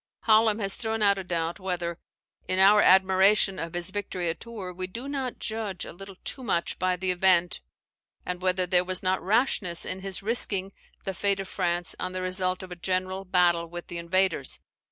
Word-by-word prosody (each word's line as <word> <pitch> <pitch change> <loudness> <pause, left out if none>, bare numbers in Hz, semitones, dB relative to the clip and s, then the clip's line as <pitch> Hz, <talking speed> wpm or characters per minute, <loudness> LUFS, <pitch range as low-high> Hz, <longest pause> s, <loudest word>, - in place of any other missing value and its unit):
Hallam 220 -1 +4
has 195 -3 +1
thrown 220 -1 -2
out 200 -1 +4
a - - -5
doubt 170 0 -3
whether, 175 -2 -3 0.5
in 185 - +1
our 200 +2 +7
admiration 190 +1 +4
of 165 +1 -5
his 175 +1 -3
victory 185 -3 -3
at - - -9
Tours, 210 -6 -7
we 185 0 -3
do 235 +8 -7
not 270 -3 -3
judge 215 -4 -4
a - - -9
little 195 +2 -10
too 265 - -4
much 170 -8 -1
by 185 0 +1
the 185 +1 -1
event, 180 -1 +2 0.6
and 180 0 -4
whether 185 0 +1
there 180 0 +3
was 185 +1 -2
not 185 0 +1
rashness 205 -4 +1
in 185 - -4
his 195 0 -6
risking 200 -3 +2 0.3
the 195 - -3
fate 200 +1 0
of 195 - -4
France 175 -1 -1
on 185 - -4
the 185 - -3
result 185 0 0
of 185 - -10
a - - -5
general 185 +2 -2
battle 175 -2 +2
with 175 +1 -8
the 170 - -5
invaders. 170 -4 0
185 Hz, 195 wpm, -27 LUFS, 180-195 Hz, 0.6 s, our